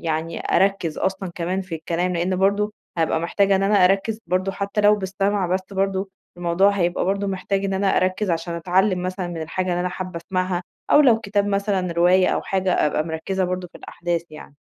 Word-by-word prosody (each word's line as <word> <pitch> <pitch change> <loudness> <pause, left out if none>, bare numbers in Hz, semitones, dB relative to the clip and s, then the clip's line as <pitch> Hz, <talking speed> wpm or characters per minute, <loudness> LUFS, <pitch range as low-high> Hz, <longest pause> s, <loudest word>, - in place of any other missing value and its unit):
يعني 165 0 -3 0.2
أركز 190 -5 +1
أصلًا 190 -1 -2
كمان 180 +2 -2
في 180 -3 -6
الكلام، 170 +3 -2
لأن 180 +2 0
برضه 200 +2 +1 0.3
هابقى 160 0 +1
محتاجة 195 +3 +2
إن 195 - 0
أنا 200 -2 +4
أركز 195 +4 +2
برضه 185 +2 0
حتى 200 +2 -2
لو 210 0 +6
بالسمع 195 0 -1
بس، 185 +2 0
برضه 195 0 -1 0.3
الموضوع 175 +3 +3
هيبقى 175 -3 0
برضه 200 +2 0
محتاج 195 +1 -2
إن 195 -1 -1
أنا 195 0 +1
أركز 185 +1 +1
عشان 170 +1 -2
أتعلم 185 +2 +1
مثلًا 185 0 -3
من 165 -2 -5
الحاجة 185 +4 -3
اللي 175 0 0
أنا 180 - 0
حابة 185 -1 -6
أسمعها، 185 -1 -1 0.3
أو - - +7
لو 245 -6 +5
كتاب 205 -1 0
مثلًا، 200 -3 0
رواية 180 +2 +4
أو - - 0
حاجة، 190 -4 +1
أبقى 155 +1 0
مركزة 185 +4 -2
برضه 180 0 -3
في - - -12
الأحداث 170 -1 -3
يعني. 155 -1 -12
185 Hz, 195 wpm, -22 LUFS, 175-195 Hz, 0.3 s, أو